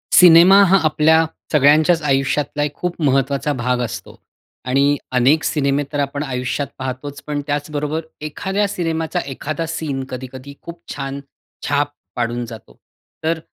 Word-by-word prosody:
Cinema 180 +3 +8
हा 195 +2 +5
आपल्या 160 +1 +4 0.3
सगळ्यांच्याच 155 +3 +4
आयुष्यातला 145 +1 0
एक 150 - -2
खूप 180 -1 -4
महत्वाचा 140 +1 +1
भाग 125 -1 -1
असतो. 115 - -6 0.4
आणि 140 +3 +2 0.2
अनेक 140 +6 +4
सिनेमे 140 -1 +1
तर 145 - -2
आपण 140 +1 -2
आयुष्यात 130 +1 -2
पाहतोच, 130 +2 -6
पण 145 -1 -2
त्याचबरोबर 150 +1 -2 0.2
एखाद्या 190 +7 -1
सिनेमाचा 165 -5 -2
एखादा 155 +4 -4
सीन, 155 -4 -3
कधी-कधी 130 +2 -8
खूप 170 0 -10
छान 135 0 -5 0.5
छाप 145 0 +1 0.2
पाडून 120 0 -2
जातो. 110 - -12 0.5
तर 160 +1 0
145 Hz, 135 wpm, -19 LUFS, 135-160 Hz, 0.5 s, Cinema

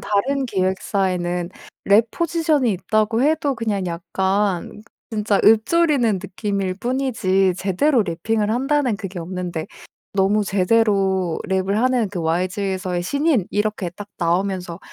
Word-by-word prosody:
다른 265 +7 0
기획사에는 185 -3 -1 0.3
랩 215 +3 +4
포지션이 320 -7 +1
있다고 215 +5 0
해도 290 -1 +1
그냥 215 -5 -2
약간 190 +3 -1 0.3
진짜 210 -2 +1
읊조리는 245 +1 +4
느낌일 195 -1 -3
뿐이지 225 -7 +1
제대로 225 - +2
래핑을 205 +4 -1
한다는 265 0 +1
그게 195 -3 -7
없는데 175 -1 -4 0.5
너무 200 +2 +2
제대로 195 -3 +1
랩을 190 +1 0
하는 245 0 +2
그 185 -3 -5
"YG에서의 185 +2 -1
신인." 280 - +1
이렇게 210 -3 -1
딱 205 +4 -10
나오면서 180 0 -1
200 Hz, 290 characters per minute, -21 LUFS, 185-230 Hz, 0.5 s, 랩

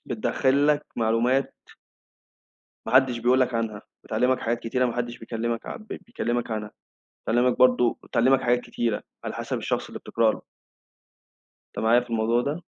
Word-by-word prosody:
بتدخّل 140 +2 +1
لك 150 0 +2
معلومات 120 +4 +1 1.3
ماحدش 130 -2 +4
بيقول 125 +3 +3
لك 130 -1 +1
عنها، 110 -3 -2 0.2
بتعلمك 125 +4 +1
حاجات 115 +1 -1
كتيرة 125 +2 0
ما 120 - -2
حدش 120 0 -3
بيكلمك 115 0 -4
عن 215 - -7
بيكلمك 120 - -3
عنها 105 -1 -4 0.5
بتعلمك 120 +2 +2
برضه 125 -2 +4
بتعلمك 130 +3 +3
حاجات 120 0 +2
كتيرة 115 -3 -2 0.2
على - - -4
حسب - - -3
الشخص - - -2
اللي - - -8
بتقرأ 115 -1 +1
له. - - -9 1.3
أنت - - -5
معايا 115 +2 +4
في 125 - -9
الموضوع 115 +1 +1
ده؟ 145 +7 -3
120 Hz, 150 wpm, -25 LUFS, 115-130 Hz, 1.3 s, ماحدش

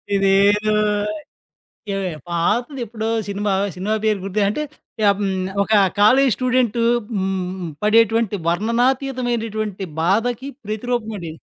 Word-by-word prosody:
ఇదేదో 200 +2 +3 1.4
ఏ - - -7
పాతదెప్పుడో 225 - -1 0.2
cinema. 200 0 -1 0.2
Cinema 195 +4 -2
పేరు 215 -2 +2
గుర్తు 195 +2 -2
అంటే 300 +9 -2 0.5
ఆహ్, - - +5
హ్మ్. 195 -2 -1 0.3
ఒక 205 - -7 0.3
కాలేజి 255 +6 +5
స్టూడెంటు 250 -3 +1 0.3
హ్మ్. 190 -2 -2
పడేటువంటి 225 0 +3
వర్ణనాతీతమైనటువంటి 230 0 0 0.2
బాధకి 230 +9 0 0.2
ప్రతిరూపమండి 215 -4 -3
ఇది. 160 - -13
215 Hz, 100 wpm, -20 LUFS, 195-240 Hz, 1.4 s, ఆహ్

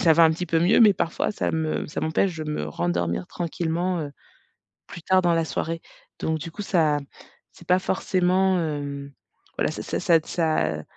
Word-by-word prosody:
ça 170 -5 +5
va 165 +1 +6
un 160 - +6
petit 180 +2 -4
peu 165 +1 +2
mieux, 175 +8 +4
mais 215 -3 +8
parfois, 170 -2 -1
ça 205 - -2
me 160 -1 -1
ça - - -5
m'empêche 170 +3 0
de 155 - -4
me 150 - -3
rendormir 85 +2 -1
tranquillement, 175 +1 -2
heu, 145 -2 -5 0.8
plus 170 - -10
tard, 185 +1 +3
dans 175 -1 +3
la 165 - +1
soirée. 165 +1 -3 0.4
Donc, 160 0 -1
du 165 +2 -7
coup, 205 - -6
ça 160 -7 +2 0.5
c'est 170 - -17
pas 180 +1 +5
forcément, 185 0 +1
hem, 145 -3 -4 0.4
voilà - - +1
ça - - -6
ça - - -3
ça, 170 - +4
heu, - - -6
ça 155 - 0
165 Hz, 195 wpm, -24 LUFS, 155-180 Hz, 0.8 s, mais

